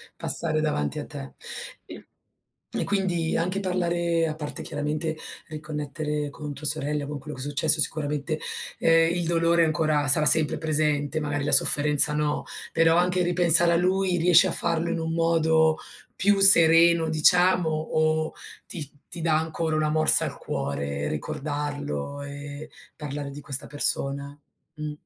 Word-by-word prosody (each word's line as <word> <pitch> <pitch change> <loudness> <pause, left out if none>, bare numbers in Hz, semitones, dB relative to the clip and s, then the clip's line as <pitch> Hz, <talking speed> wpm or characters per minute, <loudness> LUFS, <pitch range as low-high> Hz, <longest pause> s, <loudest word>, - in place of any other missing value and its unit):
passare 155 -2 -3
davanti 75 - -2
a - - -6
te. 70 0 -10 0.5
I - - -12 0.7
e - - -1
quindi 180 -5 -1
anche 185 +4 -2
parlare 170 -3 -1
a 155 - -5
parte 150 -2 -7
chiaramente 150 +2 -4 0.3
riconnettere 150 -1 -5
con 150 0 -8
tua 150 - -10
sorella, 150 -1 -2
con 150 -1 -6
quello 150 0 -10
che - - -7
è - - -4
successo, 155 +2 0
sicuramente, 150 0 -2 0.4
ehm, 165 +1 +3
il 175 - -2
dolore 170 0 +2
ancora 155 -2 0
sarà 150 +3 +5
sempre 155 0 +4
presente, 155 -1 -1
magari 145 -1 -3
la 145 - -1
sofferenza, 150 +1 +4
no, 150 0 -2 0.3
però 165 0 +3
anche 180 +1 +1
ripensare 175 -1 +4
a - - +2
lui 185 0 0
riesci 175 0 +5
a - - -2
farlo 170 0 +1
in 170 -1 -2
un 160 0 -4
modo 160 -1 +1 0.4
più 200 +1 +2
sereno 170 -3 +7
diciamo 180 +2 +3
o 155 0 -1 0.3
ti 150 -6 -7 0.3
ti 170 - -6
dà 160 -2 +1
ancora 160 0 -3
una 155 0 0
morsa 155 0 +3
al - - -6
cuore 70 +1 -4
ricordarlo 145 - -5
e 145 +2 -9 0.3
parlare 145 -1 -6
di 145 - -10
questa 135 -2 -4
persona? 140 0 -1 0.4
Mh. 150 -1 -6
155 Hz, 150 wpm, -24 LUFS, 145-165 Hz, 0.7 s, sereno